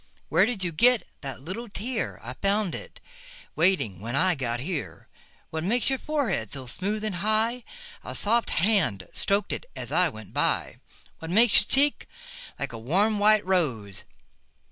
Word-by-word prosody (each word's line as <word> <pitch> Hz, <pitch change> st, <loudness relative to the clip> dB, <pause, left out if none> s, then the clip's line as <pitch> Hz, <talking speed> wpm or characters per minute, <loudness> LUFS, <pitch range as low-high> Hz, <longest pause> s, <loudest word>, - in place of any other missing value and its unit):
Where 180 Hz, +6 st, +4 dB
did 225 Hz, -6 st, -2 dB
you 175 Hz, -, 0 dB
get 240 Hz, +8 st, +4 dB, 0.2 s
that 135 Hz, -3 st, -6 dB
little 215 Hz, +9 st, -6 dB
tear?I 215 Hz, -, -4 dB
found 200 Hz, +4 st, 0 dB
it -, -, -8 dB, 0.6 s
waiting 160 Hz, -, +2 dB
when 115 Hz, +5 st, -4 dB
I 185 Hz, +5 st, +4 dB
got 120 Hz, -5 st, -2 dB
here. 155 Hz, +3 st, -5 dB, 0.4 s
What 160 Hz, 0 st, -3 dB
makes 240 Hz, +8 st, +1 dB
your 265 Hz, -, 0 dB
forehead 285 Hz, -, -1 dB
so 135 Hz, -2 st, -6 dB
smooth 200 Hz, -, -3 dB
and 210 Hz, -4 st, -2 dB
high?A 235 Hz, -, -2 dB
soft 230 Hz, +3 st, +1 dB
hand 165 Hz, -, +1 dB
strok'd 200 Hz, +1 st, 0 dB
it -, -, -5 dB
as -, -, -6 dB
I -, -, +3 dB
went -, -, -11 dB
by. -, -, 0 dB, 0.4 s
What 160 Hz, -, -7 dB
makes 220 Hz, +4 st, +6 dB
your 195 Hz, -, -3 dB
cheek 285 Hz, +2 st, +2 dB, 0.5 s
like 140 Hz, -3 st, -4 dB
a 115 Hz, -, -6 dB
warm 200 Hz, -, +2 dB
white 215 Hz, 0 st, +4 dB
rose? 130 Hz, -, 0 dB
195 Hz, 160 wpm, -26 LUFS, 140-220 Hz, 0.6 s, makes